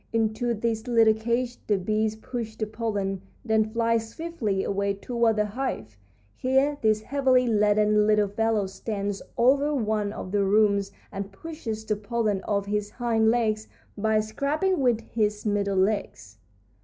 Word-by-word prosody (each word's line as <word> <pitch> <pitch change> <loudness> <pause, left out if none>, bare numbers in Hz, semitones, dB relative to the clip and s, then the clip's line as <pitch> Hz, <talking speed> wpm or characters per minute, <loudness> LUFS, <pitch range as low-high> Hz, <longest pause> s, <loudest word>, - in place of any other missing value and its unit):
Into 230 +1 0
this 225 +1 -2
little 225 -2 +5
cage 235 +3 -2
the 205 - +3
bees 215 +3 0
push 225 -1 -6
the 220 - -2
pollen, 205 -3 -3 0.2
then 220 -1 +2
fly 230 0 +1
swiftly 225 -5 -3
away 200 0 -1
toward 235 +2 +1
the 210 -1 +1
hive. 210 - -4 0.4
Here 265 - +1
this 215 -1 +2
heavily 260 -1 +2
laden 210 -1 +3
little 210 -1 +3
fellow 220 0 0
stands 200 +1 -4 0.2
over 280 +5 +3
one 215 -4 0
of 185 - -7
the 205 0 +2
rooms 200 0 +3 0.2
and 195 0 -5
pushes 225 -3 -6
the 215 -1 0
pollen 210 -2 -1
off 200 -1 0
his 205 0 -2
hind 225 -2 +1
legs 220 -2 +1 0.3
by 215 +1 +2
scraping 290 - 0
with 245 -4 +2
his 210 -2 -2
middle 200 -2 0
legs. 185 - -1
220 Hz, 150 wpm, -26 LUFS, 205-235 Hz, 0.4 s, little